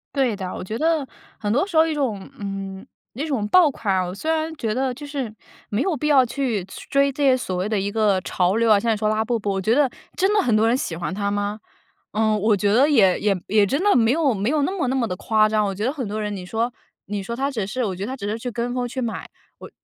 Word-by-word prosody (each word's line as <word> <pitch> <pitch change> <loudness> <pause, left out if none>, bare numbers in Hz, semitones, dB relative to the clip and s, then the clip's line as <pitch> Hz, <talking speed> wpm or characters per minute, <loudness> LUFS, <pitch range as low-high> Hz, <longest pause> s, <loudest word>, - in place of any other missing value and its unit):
对 265 -5 +2
的， 190 -2 -5
我 - - -6
觉 215 +4 -4
得 320 -2 +1 0.3
很 205 -1 -2
多 280 - +2
时 375 - -8
候 315 0 +6
一 320 - -1
种 235 -10 -2
嗯， 195 -1 -5 0.3
那 280 +6 -3
种 260 -9 -1
爆 355 +1 +6
款 210 -7 -2
啊， 185 - +2
我 180 - -6
虽 315 +10 -2
然 320 0 -1
觉 225 -6 -2
得 260 +1 0
就 290 +4 -9
是 275 -6 -4 0.4
没 210 +4 -1
有 375 -3 +1
必 300 - -2
要 275 -4 +5
去 240 -5 -2
去 190 - -11
追 275 0 +3
这 285 - -6
些 270 -2 +5
所 190 -8 -3
谓 185 +2 -1
的 215 -1 0
一 200 +1 -1
个 205 -3 +2
潮 180 +2 0
流 230 -1 +3
啊， 205 - +6
像 225 +2 +1
你 - - 0
说 215 0 0
拉 215 +1 0
布 235 0 0
布， 205 -1 -3
我 195 -1 -1
觉 220 +5 +2
得 280 -3 +3 0.2
真 385 +2 +2
的 420 - +4
很 235 - +2
多 215 - +3
人 240 - +3
喜 175 - -3
欢 175 +2 -4
它 200 +1 -1
吗？ 205 +1 -2 0.5
嗯， 215 0 +2
我 215 +1 +3
觉 200 +1 +1
得 265 +6 +5
也 200 -11 +4
也 205 -1 +2
也 210 0 +4
真 275 - -1
的 410 - +5
没 230 -1 +4
有 295 -4 +2
没 205 +3 -1
有 300 -1 +2
那 280 - 0
么 365 -9 -1
那 260 - 0
么 250 -3 +1
地 200 - -3
夸 215 +1 +2
张， 215 -1 +2
我 195 -1 -2
觉 205 - -4
得 250 - +1
很 270 -6 -4
多 215 +2 -3
人 210 -1 -3
你 185 -2 -6
说 230 +5 -2 0.3
你 205 0 -3
说 235 +5 -5
他 275 +3 -1
只 215 -7 -3
是 250 +5 -2
我 195 -5 -1
觉 185 - -5
得 - - -6
他 260 - -4
只 215 -7 -7
是 220 +2 -3
去 245 +2 -4
跟 240 +2 -3
风 245 -1 -1
去 260 +2 -4
买。 235 -2 -4 0.3
我 - - -11
225 Hz, 315 characters per minute, -22 LUFS, 205-270 Hz, 0.5 s, 候